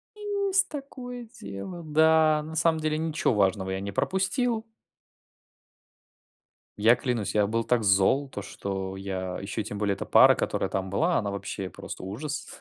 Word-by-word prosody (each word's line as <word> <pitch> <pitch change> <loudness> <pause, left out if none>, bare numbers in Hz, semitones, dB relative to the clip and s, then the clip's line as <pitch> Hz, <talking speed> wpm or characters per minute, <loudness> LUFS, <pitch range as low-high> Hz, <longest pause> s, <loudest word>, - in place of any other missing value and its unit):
Есть 400 -2 +1
такое 250 -4 -7
дело, 135 - -7
да, 155 0 +4
на 160 +1 -8
самом 160 0 +3
деле 155 0 0
ничего 160 -4 0
важного 95 -2 +1
я 95 - -2
не 100 - -4
пропустил. 220 - 0 2.1
Я 115 +4 +5
клянусь, 120 -5 -2
я 105 -1 +3
был 115 +2 0
так 120 -1 +1
зол 100 +8 +3
то, 105 - -6
что 95 -1 -5
я- 95 -2 -4
еще 100 +3 -3
и - - -4
тем 105 0 -6
более 100 -1 +1
эта - - -5
пара, - - +7
которая - - -1
там 95 0 -2
была,- 165 - +1
она 100 -2 -1
вообще 100 -1 -5
просто 80 - -8
ужас. 135 +11 -4
125 Hz, 160 wpm, -27 LUFS, 100-165 Hz, 2.1 s, пара